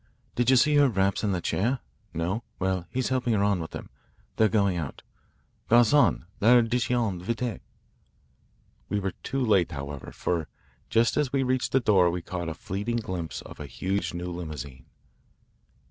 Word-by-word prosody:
Did 120 0 +1
you 130 - +6
see 145 +4 +4
her 145 -2 +6
wraps 95 -2 +1
in 105 - +1
the 90 -2 -1
chair? 120 +11 0 0.3
No? 85 +7 -2 0.2
Well, 95 -2 -1
he's 130 0 -1
helping 125 -3 +1
her 100 - +2
on 100 -2 +2
with 80 - -5
them. - - -8 0.4
They're 110 -1 +4
going 100 -4 +2
out. 80 -5 -5 0.7
Garcon, 120 - +5
l'addition 120 -3 +3
vite." 115 +2 -3 1.3
We 105 - 0
were 95 -1 -2
too 135 -1 -1
late, 95 -6 +3
however, 70 -1 -6
for 85 -3 -2 0.4
just 115 +1 +2
as 145 -3 +1
we 135 -1 +1
reached 130 0 0
the 135 - +4
door 100 -7 +4
we 85 0 -3
caught 90 -2 -4
a 80 - -5
fleeting 105 +4 -3
glimpse 90 -7 -4
of - - -12
a 75 - -6
huge 95 +9 -2
new 90 +1 -4
limousine. 75 -7 -7
100 Hz, 165 wpm, -27 LUFS, 90-120 Hz, 1.3 s, you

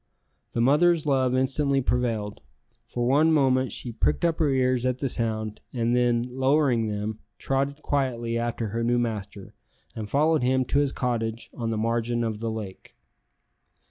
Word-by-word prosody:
The 115 - 0
mother's 155 +6 +4
love 130 -3 +2
instantly 135 +2 +2
prevailed. 115 -5 -1 0.5
For 120 -1 -2
one 145 +6 +4
moment 130 -4 +2
she 120 - -5
pricked 115 +8 0
up 165 -1 0
her 155 -3 +3
ears 130 -2 +1
at 130 -1 0
the 135 - -2
sound, 110 -3 -2
and 120 -1 +1
then, 120 -1 +2
lowering 130 -2 +2
them, 105 +1 -3 0.2
trotted 140 +2 -2
quietly 120 -5 -1
after 115 -1 -2
her 115 +3 -2
new 120 +1 +2
master, 105 -4 -4 0.4
and 110 -2 -5
followed 155 +2 +2
him 130 +1 +2
to 140 - +1
his 145 -2 +1
cottage 115 -3 -3
on 115 -2 -3
the 110 - -1
margin 115 +1 0
of 110 -2 -3
the 115 0 -2
lake. 105 -4 -7
125 Hz, 165 wpm, -26 LUFS, 115-135 Hz, 0.5 s, mother's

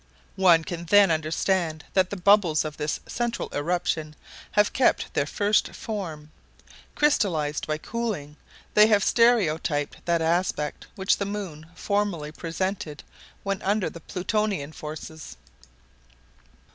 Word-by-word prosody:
One 180 -4 +5
can 170 +1 -5
then 200 +1 +6
understand 160 0 0
that 185 -1 +3
the 200 - -5
bubbles 180 -5 +4
of 150 -1 -5
this 150 0 -2
central 240 -1 -2
eruption 155 0 -1 0.4
have 210 0 +3
kept 260 - +2
their 140 - 0
first 205 +5 +1
form. 165 -9 -6 0.6
Crystallized 170 - +1
by 155 0 -1
cooling, 195 -7 -4 0.4
they 210 0 +7
have 205 -3 +4
stereotyped 165 -11 +2
that 170 -1 +2
aspect 165 -3 -1
which 190 0 +2
the 200 - -2
moon 185 -7 -6
formerly 195 -6 -1
presented 165 -2 -4 0.4
when 195 -1 -2
under 200 0 0
the 170 - -10
Plutonian 190 -4 -2
forces. 155 +1 -8
175 Hz, 120 wpm, -25 LUFS, 155-205 Hz, 0.6 s, they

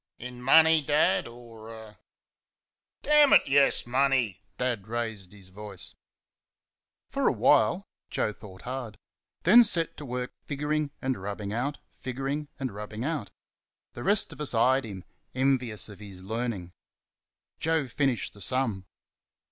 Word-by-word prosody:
"In 125 0 -9
money, 160 +4 +6
Dad, 145 -9 +2
or 115 -2 -12
er 110 -1 -11 0.5
?" - - -66
"Dammit, 300 -1 +6
yes; 140 0 +3
MONEY!" 125 -5 +1 0.2
Dad 120 -6 -2
raised 110 -5 -4
his 100 -3 -9
voice. 100 -1 -6 1.2
For - - +1
a - - +5
while, - - +3 0.2
Joe 105 - -1
thought 95 -3 -13
hard, 125 -4 -5 0.5
then 235 +8 +8
set 170 -7 0
to 145 - -8
work 125 0 -4 0.2
figuring 150 +1 -1
and 130 -6 -1
rubbing 100 +1 -4
out, 135 +6 -2
figuring 135 +3 -4
and 130 -3 -3
rubbing 105 +2 -6
out. 145 -8 -2 0.6
The 120 - -7
rest 205 +1 +3
of - - -10
us 145 -5 -1
eyed 130 +3 +3
him, 95 -4 -8 0.3
envious 130 -6 +1
of 105 -2 -12
his 100 -3 -10
learning. 110 -4 -3 0.9
Joe 160 -3 +1
finished 130 -1 -1
the 100 - -15
sum. 100 -2 -1
120 Hz, 140 wpm, -28 LUFS, 105-140 Hz, 1.2 s, then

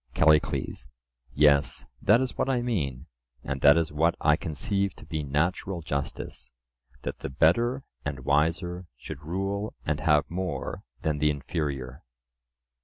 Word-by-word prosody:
CALLICLES: 75 -6 +2 0.5
Yes; 70 -1 +4 0.2
that 115 +5 +5
is 130 - -2
what - - 0
I 125 -2 +1
mean, 75 - -2 0.4
and 70 0 -3
that 70 +3 +7
is 80 -2 +1
what 80 +3 +2
I 75 -1 +4
conceive 100 +4 -1
to - - -13
be 80 -3 -3
natural 85 +5 -1
justice—that 60 -3 -6
the - - -4
better 115 - +2 0.2
and 70 -1 -4
wiser 85 +5 +1
should 70 - -8
rule 95 +6 -3
and 75 0 0
have 75 0 +3
more 90 +1 -4 0.2
than 75 -2 0
the 75 0 +3
inferior. 70 -2 -3
75 Hz, 135 wpm, -27 LUFS, 70-90 Hz, 0.5 s, that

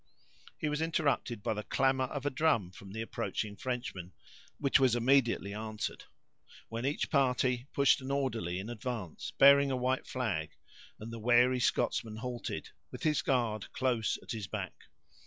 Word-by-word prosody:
He - - -2
was 150 +1 -1
interrupted 140 -9 0
by - - 0
the 105 - -3
clamor 130 +3 +1
of 140 +2 -5
a 145 - +1
drum 130 - +2
from 95 +1 -12
the 110 +2 -3
approaching 105 -2 -3
Frenchmen, 120 -6 -4 0.4
which 140 -1 +3
was 130 -3 +4
immediately 120 -5 +2
answered, 110 0 -4 0.6
when 115 +3 -2
each 145 - -1
party 130 -3 +2
pushed 140 -1 +4
an 130 - -6
orderly 115 -11 -1
in 95 +3 -5
advance, 115 -7 -5
bearing 140 0 +7
a 130 - 0
white 130 +1 0
flag, 95 -12 -2 0.4
and 115 +2 -7
the 115 - -6
wary 125 +3 +4
Scotsman 115 -2 0
halted 120 +2 -5 0.2
with - - -9
his 155 -2 +2
guard 115 -5 0
close 120 -4 0
at - - -8
his 110 -4 -4
back. - - -4
125 Hz, 160 wpm, -32 LUFS, 110-135 Hz, 0.6 s, bearing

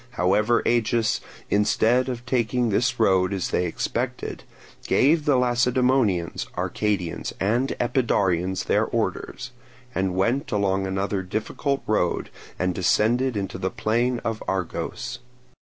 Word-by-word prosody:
However, 105 +6 +2
Agis, 115 -1 +1 0.3
instead 110 +5 +3
of 125 -1 -5
taking 125 -1 +1
this 120 +4 +1
road 95 -3 +3
as 95 -2 -2
they 90 - 0
expected, 80 - -3 0.4
gave 150 +3 +3
the 145 -3 +4
Lacedaemonians, 125 -6 +1
Arcadians, 100 -6 -2
and 120 +7 0
Epidaurians 95 -7 +1
their - - +2
orders, 125 0 -3 0.4
and 95 -1 -1
went 120 - 0
along 95 -2 +1
another 95 +1 -1
difficult 110 +8 -2
road, 105 -5 0 0.3
and 90 0 0
descended 115 +7 +2
into 95 -2 -4
the - - -1
plain 120 +3 0
of 115 -1 -2
Argos. 95 +6 -3
110 Hz, 120 wpm, -24 LUFS, 95-125 Hz, 0.4 s, the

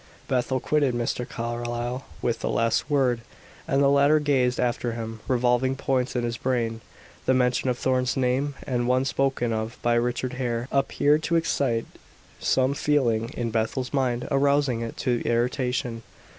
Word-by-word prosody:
Bethel 130 0 0
quitted 140 -2 +1
Mr. 120 +1 -2
Carlyle 120 +2 -3 0.2
with 120 - 0
the - - -2
last 115 +5 +1
word, 130 -5 +2 0.5
and 140 -2 +2
the - - +5
latter 140 +2 +5
gazed 130 -4 +1
after 120 -1 0
him, 115 -1 -5
revolving 125 +1 +2
points 130 -2 -1
in 120 - 0
his 120 -1 -2
brain. 115 -3 -1 0.5
The 130 - +4
mention 125 0 +2
of 125 - 0
Thorn's 125 -2 0
name, 135 +2 0
the 125 -2 0
one 125 +2 +2
spoken 135 -3 0
of 110 +1 -3
by 120 - +3
Richard 125 +2 0
Hare, 120 -1 -1
appeared 145 +2 +2
to 170 +2 0
excite 135 -8 +1 0.5
some 130 +1 +2
feeling 120 -6 +1
in 115 -1 -2
Bethel's 115 +4 -1
mind, 125 -3 0
arousing 140 -3 +2
it 115 -1 -5
to 120 -2 0
irritation. 120 0 -1
125 Hz, 155 wpm, -25 LUFS, 120-135 Hz, 0.5 s, the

